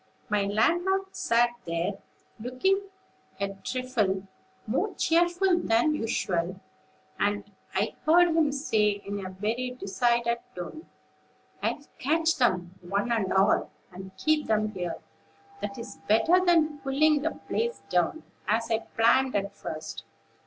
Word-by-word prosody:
My 205 Hz, -1 st, +2 dB
landlord 350 Hz, -, +1 dB
sat 240 Hz, -10 st, +3 dB
there, 170 Hz, +4 st, -2 dB, 0.4 s
looking 380 Hz, -, 0 dB, 0.5 s
a 200 Hz, 0 st, -1 dB
trifle 230 Hz, -7 st, 0 dB, 0.4 s
more 270 Hz, -, -1 dB
cheerful 350 Hz, +2 st, +3 dB
than 240 Hz, +3 st, +2 dB
usual, 185 Hz, -, -1 dB, 0.6 s
and 205 Hz, 0 st, 0 dB, 0.2 s
I 200 Hz, +3 st, +1 dB
heard 345 Hz, +3 st, +6 dB
him 320 Hz, -3 st, +3 dB
say, 215 Hz, -7 st, +1 dB
in 200 Hz, 0 st, -4 dB
a 185 Hz, -, -5 dB
very 230 Hz, +7 st, -3 dB
decided 235 Hz, +4 st, +1 dB, 0.2 s
tone: 180 Hz, -, -7 dB, 0.7 s
"'I'll 290 Hz, -, -2 dB
catch 320 Hz, +4 st, +2 dB
them, 185 Hz, -7 st, +1 dB
one 200 Hz, +6 st, -1 dB
and 220 Hz, -5 st, +1 dB
all, 195 Hz, +2 st, +3 dB, 0.2 s
and 190 Hz, +1 st, -9 dB
keep 310 Hz, +7 st, +1 dB
them 215 Hz, -1 st, +1 dB
here; 180 Hz, -4 st, -4 dB, 0.6 s
that 270 Hz, -, -4 dB
is 235 Hz, 0 st, -8 dB
better 275 Hz, -, +4 dB
than 320 Hz, -4 st, +3 dB
pulling 285 Hz, +2 st, +3 dB
the 320 Hz, +2 st, -2 dB
place 470 Hz, +1 st, -1 dB
down, 320 Hz, -2 st, 0 dB, 0.2 s
as 230 Hz, +1 st, +1 dB
I 225 Hz, -, +3 dB
planned 255 Hz, +4 st, +2 dB
at 200 Hz, 0 st, -1 dB
first. 155 Hz, 0 st, -6 dB
235 Hz, 130 wpm, -28 LUFS, 200-310 Hz, 0.7 s, heard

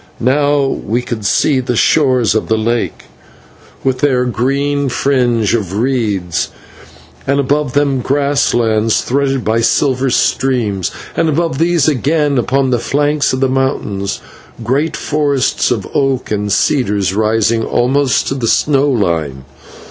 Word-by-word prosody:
Now 145 Hz, +3 st, +2 dB
we 120 Hz, -2 st, -2 dB
could 110 Hz, -5 st, -4 dB
see 135 Hz, +5 st, +2 dB
the 125 Hz, -1 st, -2 dB
shores 130 Hz, -3 st, +2 dB
of 110 Hz, -, -1 dB
the 110 Hz, -, +1 dB
lake, 115 Hz, +2 st, -2 dB, 0.8 s
with 130 Hz, -1 st, 0 dB
their 130 Hz, -3 st, +2 dB
green 140 Hz, +4 st, -1 dB
fringe 120 Hz, -5 st, +1 dB
of 100 Hz, -6 st, -2 dB
reeds; 105 Hz, -, -1 dB, 0.8 s
and 140 Hz, +1 st, +1 dB
above 140 Hz, -1 st, 0 dB
them 140 Hz, -2 st, +1 dB
grass 140 Hz, +2 st, +1 dB
lands 110 Hz, -2 st, +1 dB
threaded 135 Hz, -1 st, -1 dB
by 110 Hz, +2 st, +1 dB
silver 130 Hz, +2 st, +1 dB
streams; 120 Hz, -8 st, 0 dB, 0.3 s
and 165 Hz, -1 st, +1 dB
above 160 Hz, -2 st, -1 dB
these 170 Hz, -3 st, +2 dB
again, 145 Hz, 0 st, +1 dB
upon 130 Hz, +2 st, 0 dB
the 120 Hz, -, +1 dB
flanks 145 Hz, +3 st, 0 dB
of 130 Hz, -, -2 dB
the 135 Hz, -, +3 dB
mountains, 130 Hz, -7 st, -2 dB, 0.4 s
great 140 Hz, +8 st, -1 dB
forests 145 Hz, -3 st, 0 dB
of -, -, -2 dB
oak 135 Hz, -4 st, 0 dB
and 105 Hz, -1 st, -1 dB
cedars 100 Hz, -, +1 dB
rising 110 Hz, +2 st, +1 dB
almost 130 Hz, +3 st, +1 dB
to -, -, -1 dB
the 130 Hz, -4 st, -2 dB
snow 145 Hz, +3 st, +2 dB
line. 80 Hz, -, -1 dB
130 Hz, 140 wpm, -14 LUFS, 110-140 Hz, 0.8 s, the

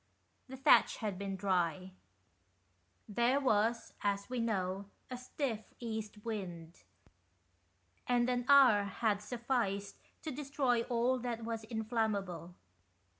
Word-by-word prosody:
The 265 Hz, 0 st, -8 dB
thatch 270 Hz, -, +5 dB
had 205 Hz, -4 st, -3 dB
been 195 Hz, -1 st, -3 dB
dry; 185 Hz, -1 st, 0 dB, 1.2 s
there 235 Hz, +6 st, +2 dB
was, 230 Hz, -3 st, +1 dB
as 200 Hz, +2 st, -1 dB
we 250 Hz, -, -1 dB
know, 195 Hz, -4 st, -1 dB, 0.3 s
a 250 Hz, -, -3 dB
stiff 255 Hz, -2 st, -2 dB, 0.2 s
east 220 Hz, -2 st, -5 dB
wind, 175 Hz, -7 st, -5 dB, 1.3 s
and 245 Hz, -1 st, +3 dB
an 245 Hz, -1 st, 0 dB
hour 255 Hz, -8 st, +7 dB
had 205 Hz, +1 st, 0 dB
sufficed 225 Hz, -5 st, -2 dB, 0.3 s
to 315 Hz, -, -3 dB
destroy 270 Hz, -3 st, 0 dB
all 245 Hz, +2 st, +1 dB
that 235 Hz, -2 st, -3 dB
was 225 Hz, -1 st, -3 dB
inflammable. 215 Hz, -7 st, -2 dB
220 Hz, 115 wpm, -34 LUFS, 200-245 Hz, 1.3 s, hour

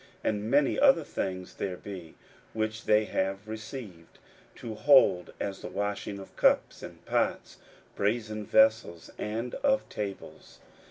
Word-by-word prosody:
And 105 Hz, 0 st, -1 dB
many 140 Hz, +2 st, +3 dB
other 275 Hz, -1 st, +5 dB
things 95 Hz, -1 st, -4 dB
there 90 Hz, -2 st, -4 dB
be, 90 Hz, -5 st, -9 dB, 0.4 s
which 110 Hz, 0 st, -3 dB
they 105 Hz, 0 st, +4 dB
have 95 Hz, +1 st, -2 dB
received 110 Hz, -6 st, -8 dB, 0.4 s
to 115 Hz, -, -7 dB
hold, 130 Hz, -7 st, +5 dB
as 100 Hz, -1 st, -4 dB
the -, -, -6 dB
washing 100 Hz, 0 st, -3 dB
of 95 Hz, -, -11 dB
cups, -, -, +2 dB
and -, -, -11 dB
pots, -, -, -1 dB, 0.4 s
brasen 110 Hz, +1 st, -1 dB
vessels, 110 Hz, -6 st, +3 dB
and 115 Hz, +3 st, -3 dB
of 270 Hz, -1 st, +1 dB
tables. 100 Hz, -2 st, -7 dB
105 Hz, 130 wpm, -29 LUFS, 95-115 Hz, 0.4 s, other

